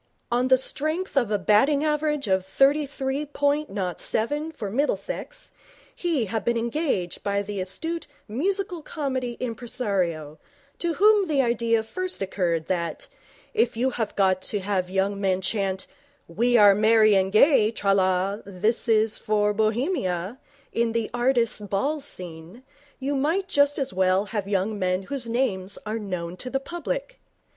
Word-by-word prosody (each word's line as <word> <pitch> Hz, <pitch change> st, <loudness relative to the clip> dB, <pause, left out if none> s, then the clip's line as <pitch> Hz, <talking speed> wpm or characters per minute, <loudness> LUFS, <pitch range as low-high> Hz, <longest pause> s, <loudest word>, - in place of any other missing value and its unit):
On 245 Hz, +2 st, +2 dB
the 260 Hz, 0 st, +6 dB
strength 310 Hz, +8 st, -2 dB
of 245 Hz, -6 st, +2 dB
a 210 Hz, -, +1 dB
batting 265 Hz, +10 st, +3 dB
average 300 Hz, -3 st, 0 dB
of 190 Hz, -1 st, +2 dB
thirty 275 Hz, +9 st, +3 dB
three 270 Hz, +1 st, -3 dB
point 290 Hz, +1 st, 0 dB
nought 185 Hz, -4 st, -3 dB
seven 295 Hz, +8 st, -1 dB
for 210 Hz, -10 st, -6 dB
Middlesex, 300 Hz, -, -3 dB, 0.4 s
he 325 Hz, -9 st, 0 dB
had 215 Hz, +1 st, -3 dB
been 235 Hz, +2 st, +1 dB
engaged 235 Hz, -, -1 dB
by 200 Hz, 0 st, -1 dB
the 205 Hz, 0 st, -5 dB
astute 325 Hz, -, -3 dB, 0.2 s
musical 365 Hz, -, -2 dB
comedy 260 Hz, -5 st, -3 dB
impresario 195 Hz, -, -2 dB, 0.4 s
to 340 Hz, -1 st, 0 dB
whom 415 Hz, -1 st, +5 dB
the 295 Hz, -3 st, +1 dB
idea 230 Hz, -1 st, +1 dB
first 370 Hz, +10 st, -4 dB
occurred 175 Hz, -4 st, -1 dB
that, 185 Hz, -, -3 dB, 0.4 s
if 235 Hz, -1 st, +1 dB
you 260 Hz, +3 st, +1 dB
have 225 Hz, -3 st, -3 dB
got 190 Hz, -2 st, +2 dB
to 205 Hz, -, -1 dB
have 190 Hz, -2 st, -1 dB
young 195 Hz, +1 st, 0 dB
men 190 Hz, -2 st, +1 dB
to -, -, -2 dB
chant 195 Hz, -3 st, -1 dB, 0.4 s
'We 235 Hz, +8 st, +2 dB
are 205 Hz, -2 st, +8 dB
merry 215 Hz, +1 st, +5 dB
and 190 Hz, -1 st, +2 dB
gay, 215 Hz, 0 st, +5 dB
tra 200 Hz, -3 st, +1 dB
la, 190 Hz, +1 st, +1 dB
for -, -, -15 dB
this 215 Hz, +6 st, 0 dB
is 220 Hz, -1 st, +3 dB
Bohemia,' 215 Hz, -, 0 dB, 0.3 s
in 230 Hz, -1 st, +1 dB
the 230 Hz, -2 st, -1 dB
Artists' 240 Hz, -3 st, +1 dB
Ball 235 Hz, +10 st, -1 dB
scene, 180 Hz, -, -8 dB, 0.4 s
you 275 Hz, +1 st, -2 dB
might 325 Hz, +8 st, 0 dB
just 285 Hz, -3 st, +3 dB
as 270 Hz, -8 st, -2 dB
well 185 Hz, +1 st, +2 dB
have 205 Hz, -3 st, -2 dB
young 200 Hz, +1 st, -1 dB
men 185 Hz, 0 st, 0 dB
whose 255 Hz, +3 st, -4 dB
names 205 Hz, -6 st, -1 dB
are 215 Hz, +2 st, -2 dB
known 180 Hz, -4 st, -5 dB
to 255 Hz, -, -6 dB
the 270 Hz, -, -1 dB
public. -, -, -5 dB
225 Hz, 160 wpm, -25 LUFS, 195-280 Hz, 0.4 s, are